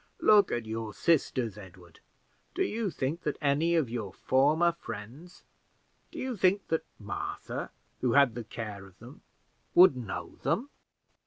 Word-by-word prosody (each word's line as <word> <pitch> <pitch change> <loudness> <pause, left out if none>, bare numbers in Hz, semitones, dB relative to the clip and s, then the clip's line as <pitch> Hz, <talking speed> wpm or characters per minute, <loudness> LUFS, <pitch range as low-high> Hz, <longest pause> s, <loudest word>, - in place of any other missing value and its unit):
Look 210 -1 +5
at 120 -1 -2
your 110 -1 -5
sisters, 125 - +1
Edward. 90 -4 -14 0.6
Do - - +2
you 220 -2 -1
think 155 +2 -3
that 150 - -2
any 150 +4 +2
of 160 -6 +2
your 115 -4 -4
former 150 - +3
friends 135 +4 -10 0.7
do - - -12
you 260 -1 -3
think 195 0 +2
that 160 0 0
Martha, 100 -2 -5 0.3
who 125 -2 +1
had 140 -4 +5
the 120 +1 -5
care 105 -3 -7
of 95 0 -20
them, 125 +7 -13 0.5
would 180 -6 +8
know 120 -6 -6
them?" 270 +6 -1
130 Hz, 150 wpm, -29 LUFS, 110-170 Hz, 0.7 s, would